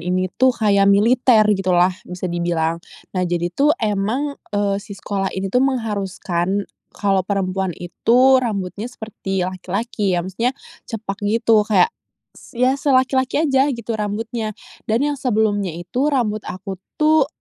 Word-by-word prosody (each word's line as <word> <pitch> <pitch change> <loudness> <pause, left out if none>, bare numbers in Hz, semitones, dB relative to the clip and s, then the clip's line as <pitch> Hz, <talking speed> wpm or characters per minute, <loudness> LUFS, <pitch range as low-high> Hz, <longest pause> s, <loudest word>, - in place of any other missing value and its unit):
ini 185 +1 -1
tuh 260 -1 +4
kaya 200 -2 +3
militer 225 +3 +5
gitu 195 -2 -2
lah 180 +1 +4 0.2
bisa 180 +1 -6
dibilang. 170 -1 -1 0.3
Nah 185 - -1
jadi 175 0 -1
tuh 295 - +3
emang, 220 - -1 0.2
eee, 200 -1 0
si 200 -1 -10
sekolah 195 -1 -2
ini 190 0 -3
tuh 250 - +3
mengharuskan 200 -6 -1 0.3
kalo 195 -2 +2
perempuan 190 -2 -1
itu 250 +9 +3
rambutnya 205 -2 -3
seperti 195 -5 -4
laki-laki 190 +2 -2
ya. 175 - 0
Maksudnya 230 +7 -1 0.4
cepak 215 -4 -5
gitu 225 0 +3
kayak, 450 - +4 0.4
s 240 - -16
ya 255 +2 +3
selaki-laki 260 +1 +2
aja 270 -2 +3
gitu 235 0 -5
rambutnya. 215 +1 -3 0.3
Dan 230 +5 +2
yang 290 - -3
sebelumnya 205 -7 0
itu 180 - -2
rambut 235 -7 0
aku 190 +1 -6 0.2
tuh 310 -2 +4
205 Hz, 145 wpm, -20 LUFS, 190-245 Hz, 0.4 s, militer